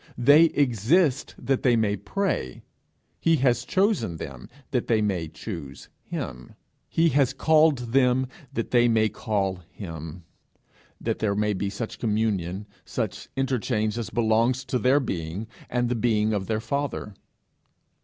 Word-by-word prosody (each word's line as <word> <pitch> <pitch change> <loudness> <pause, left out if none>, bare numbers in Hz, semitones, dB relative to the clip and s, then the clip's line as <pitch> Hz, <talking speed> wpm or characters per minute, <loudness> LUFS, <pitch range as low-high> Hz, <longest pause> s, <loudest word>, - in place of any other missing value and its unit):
They 145 +6 +7
exist 140 - +2
that 135 -1 0
they 125 -3 +4
may 110 -3 +1
pray; 190 - -2 0.6
he 165 - +3
has 125 -4 +2
chosen 195 - +1
them 65 -5 -8 0.2
that 125 -3 0
they 115 -2 +3
may 95 -6 0
choose 80 -5 -8
him; 60 0 -6 0.3
he 165 0 +3
has 135 -2 +2
called 155 -5 +3
them 130 -1 +4 0.3
that 115 -5 -3
they 120 -1 +5
may 110 -2 +3
call 100 -3 -2
him 85 -3 -8 0.8
that - - -2
there 105 -2 0
may 105 0 +1
be 100 +1 -2
such 105 +3 -6
communion, 105 -4 -1 0.2
such - - -4
interchange 120 -5 0
as 115 - -4
belongs 120 +3 +1
to 125 0 -1
their 130 +5 +4
being 90 - -4 0.2
and 120 0 0
the 120 - 0
being 110 -2 +1
of 100 -2 -2
their 110 -1 0
Father. 140 -5 -3
115 Hz, 145 wpm, -25 LUFS, 100-130 Hz, 0.8 s, They